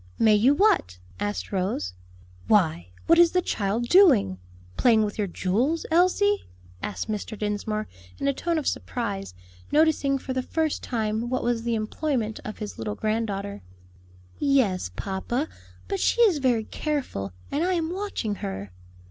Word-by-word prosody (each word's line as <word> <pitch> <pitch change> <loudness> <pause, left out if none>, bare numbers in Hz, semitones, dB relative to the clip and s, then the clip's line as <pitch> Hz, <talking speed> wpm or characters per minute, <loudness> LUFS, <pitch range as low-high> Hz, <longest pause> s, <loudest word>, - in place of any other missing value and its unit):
"May 220 -1 +5
you 240 +7 +5
what?" 95 - +3 0.2
asked 205 0 -3
Rose. 180 - -1 0.5
"Why, 155 - +2 0.2
what 335 +1 +5
is 345 -1 +6
the 365 - +3
child 215 +1 -1
doing? 260 - +5 0.4
playing 225 -3 +4
with 210 0 -4
your 205 - +1
jewels, 230 - 0
Elsie?" 370 +4 +3 0.3
asked 100 -3 -4
Mr. 215 +1 -4
Dinsmore 215 +1 -2 0.3
in 275 - -2
a 280 - +3
tone 335 +4 -1
of 305 - -2
surprise, 200 - -3 0.4
noticing 295 -3 +3
for 260 0 -5
the 260 - 0
first 315 +3 -1
time 225 0 -2
what 255 0 -1
was 235 -1 0
the 235 0 -1
employment 225 0 -2
of 215 - -6
his 210 - -7
little 105 -2 -3
granddaughter. 205 - -2 0.8
"Yes, 245 - +2
papa; 240 +9 -2 0.4
but 395 -1 -2
she - - +1
is 390 -10 +5
very 245 -4 +2
careful, 255 - -3 0.2
and 290 +4 0
I 370 +1 +1
am 330 0 -1
watching 380 - -3
her." 95 0 -5
230 Hz, 155 wpm, -26 LUFS, 200-300 Hz, 0.8 s, is